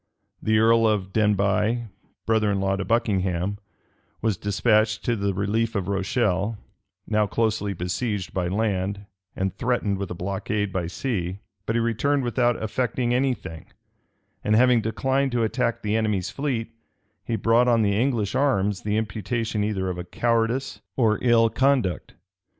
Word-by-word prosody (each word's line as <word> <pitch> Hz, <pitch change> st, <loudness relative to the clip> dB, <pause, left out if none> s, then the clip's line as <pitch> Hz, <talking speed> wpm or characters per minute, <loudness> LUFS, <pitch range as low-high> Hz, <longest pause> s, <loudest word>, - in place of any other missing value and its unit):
The 110 Hz, 0 st, +2 dB
earl 115 Hz, +1 st, +5 dB
of 100 Hz, -3 st, -1 dB
Denbigh, 105 Hz, +2 st, +2 dB, 0.4 s
brother 110 Hz, -2 st, +2 dB
in 100 Hz, -, 0 dB
law 95 Hz, 0 st, +1 dB
to 95 Hz, -, -3 dB
Buckingham, 95 Hz, -3 st, 0 dB, 0.6 s
was 110 Hz, -3 st, 0 dB
despatched 110 Hz, +3 st, +1 dB
to 120 Hz, -, +1 dB
the 100 Hz, -2 st, 0 dB
relief 105 Hz, +4 st, -1 dB
of 95 Hz, -3 st, -1 dB
Rochelle, 100 Hz, +1 st, 0 dB, 0.5 s
now 105 Hz, -1 st, +1 dB
closely 105 Hz, -1 st, 0 dB
besieged 95 Hz, +3 st, -3 dB
by 90 Hz, -2 st, -1 dB
land, 100 Hz, 0 st, -1 dB, 0.3 s
and 95 Hz, -1 st, -1 dB
threatened 110 Hz, -4 st, 0 dB
with 100 Hz, -, -4 dB
a -, -, -5 dB
blockade 100 Hz, +2 st, -2 dB
by 90 Hz, -3 st, -1 dB
sea: 95 Hz, -3 st, -3 dB, 0.3 s
but 110 Hz, -, 0 dB
he -, -, +3 dB
returned 115 Hz, +5 st, +1 dB
without 120 Hz, 0 st, +1 dB
effecting 120 Hz, +2 st, -1 dB
any 130 Hz, +1 st, +2 dB
thing; 80 Hz, -7 st, -10 dB, 0.8 s
and 105 Hz, -, +2 dB
having 125 Hz, 0 st, +5 dB
declined 135 Hz, +5 st, 0 dB
to 120 Hz, -1 st, +1 dB
attack 115 Hz, +1 st, -1 dB
the 105 Hz, 0 st, 0 dB
enemy's 105 Hz, -5 st, 0 dB
fleet, 125 Hz, -6 st, -2 dB, 0.5 s
he 115 Hz, -, -2 dB
brought 115 Hz, +3 st, +3 dB
on 115 Hz, -2 st, +4 dB
the 100 Hz, -1 st, +2 dB
English 115 Hz, -3 st, 0 dB
arms 105 Hz, -8 st, +1 dB
the 105 Hz, 0 st, -1 dB
imputation 110 Hz, 0 st, -2 dB
either 100 Hz, -3 st, -1 dB
of 90 Hz, -1 st, -5 dB
cowardice 115 Hz, +5 st, 0 dB, 0.2 s
or 110 Hz, -4 st, +3 dB
ill 115 Hz, -2 st, +4 dB
conduct. 130 Hz, -6 st, 0 dB
110 Hz, 150 wpm, -24 LUFS, 100-115 Hz, 0.8 s, earl